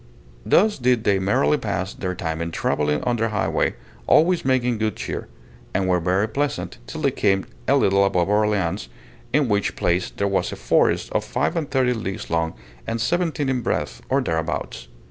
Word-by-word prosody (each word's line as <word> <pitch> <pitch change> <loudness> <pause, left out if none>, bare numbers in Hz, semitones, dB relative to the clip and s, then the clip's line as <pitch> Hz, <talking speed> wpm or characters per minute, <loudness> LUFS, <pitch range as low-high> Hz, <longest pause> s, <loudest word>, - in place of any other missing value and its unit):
Thus 210 - +3
did 125 -2 +2
they 100 -3 +3
merrily 95 -6 +2
pass 95 +2 -2
their 90 -1 -4
time 80 -2 -3
in 85 - -2
travelling 75 -2 0
on 120 -1 0
their 115 0 0
high 100 -6 0
way, 80 - 0 0.3
always 175 +2 +4
making 125 -3 +1
good 110 -2 0
cheer, - - -5 0.5
and 95 -1 +1
were 90 -1 +3
very 95 +5 +1
pleasant 140 +1 -3
till 160 - -6
they 140 -3 +2
came 95 -5 +1 0.2
a - - +4
little 100 0 +4
above 90 -3 +2
Orleans, 105 - +1 0.4
in 145 0 +3
which 105 -2 0
place 85 +1 0
there 100 - -2
was 100 -1 0
a - - -5
forest - - +1
of - - 0
five - - -1
and 160 -4 -2
thirty 130 -2 +2
leagues 95 -7 -5
long, 80 -2 0 0.3
and 115 - -2
seventeen 160 +3 0
in 130 -2 0
breadth, - - -2
or - - +2
thereabouts. 80 -6 -3
100 Hz, 185 wpm, -23 LUFS, 90-125 Hz, 0.5 s, always